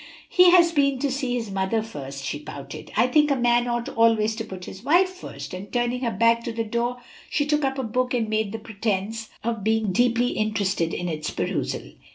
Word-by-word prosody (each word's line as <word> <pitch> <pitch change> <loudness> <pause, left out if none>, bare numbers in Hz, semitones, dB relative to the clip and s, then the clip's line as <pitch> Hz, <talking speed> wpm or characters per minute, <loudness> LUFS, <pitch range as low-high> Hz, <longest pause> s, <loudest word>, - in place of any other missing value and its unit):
"He 360 -1 +7
has 345 -1 +6
been 280 -3 +2
to 280 +1 -1
see 260 -2 -1
his 225 -4 -3
mother 195 +3 0
first," 135 -10 -7
she 145 - -3
pouted. 140 +1 -9
"I 230 - +5
think 300 +4 +3
a 280 - +3
man 240 -1 +2
ought 240 0 -1
always 225 -1 +3
to 225 - -2
put 185 -4 -8
his 190 - -10
wife 345 +7 +4
first." 370 - -9
And 185 +2 -7
turning 245 +1 0
her 240 - 0
back 230 0 +3
to 235 - -2
the 230 0 -2
door, 235 +3 -1 0.3
she 290 - +1
took 300 0 +1
up 270 0 0
a 265 - -1
book 250 +2 0
and 230 -2 0
made 215 -1 -1
a - - -2
pretence 220 0 -3
of 225 -2 -2
being 220 -1 +1
deeply 240 +4 +2
interested 200 -7 0
in 175 - -3
its 155 -2 -3
perusal. - - -3
230 Hz, 215 wpm, -24 LUFS, 205-250 Hz, 0.3 s, He